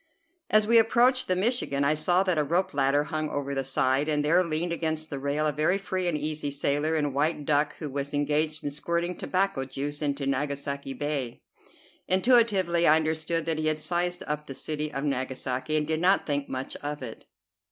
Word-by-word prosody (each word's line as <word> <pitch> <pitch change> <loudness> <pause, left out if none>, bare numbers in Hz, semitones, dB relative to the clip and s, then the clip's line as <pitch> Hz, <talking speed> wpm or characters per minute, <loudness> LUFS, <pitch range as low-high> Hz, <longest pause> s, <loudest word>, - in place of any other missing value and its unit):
As 215 0 +4
we 230 +1 +6
approached 245 +3 +3
the 185 - +2
"Michigan" 190 - 0
I 140 +2 +3
saw 175 +4 +2
that 185 -5 +1
a - - +3
rope 170 +6 0
ladder 140 +1 +2
hung 155 0 -3
over 140 -1 -3
the 135 -1 -1
side, 135 +2 +1
and 150 -1 +1
there 175 +4 +4
leaned 170 +1 -1
against 160 -1 -2
the 140 - -4
rail 140 +2 -1
a 150 - +2
very 155 +6 +1
free 185 -2 -2
and 165 -3 +1
easy 150 0 -2
sailor 145 +3 0
in 145 -3 0
white 150 +1 0
duck, 145 0 +1
who 155 - -5
was 140 0 -4
engaged 150 +2 0
in 145 - -2
squirting 170 +4 -2
tobacco 190 -7 -1
juice 140 +3 -5
into 140 -1 -1
Nagasaki 140 0 -2
Bay. 140 -3 -3 0.6
Intuitively 190 -5 +3
I 155 - +7
understood 160 +1 0
that 160 -1 -1
he 155 - 0
had 155 0 +1
sized 175 +2 -1
up 150 0 -4
the 135 - -7
city 155 +1 -3
of 135 -1 -4
Nagasaki 130 +1 -2
and 150 - 0
did 155 +1 -1
not 185 +3 +3
think 145 -1 -2
much 130 +1 -5
of 145 -1 -5
it. 115 -3 -8
150 Hz, 200 wpm, -27 LUFS, 140-170 Hz, 0.6 s, I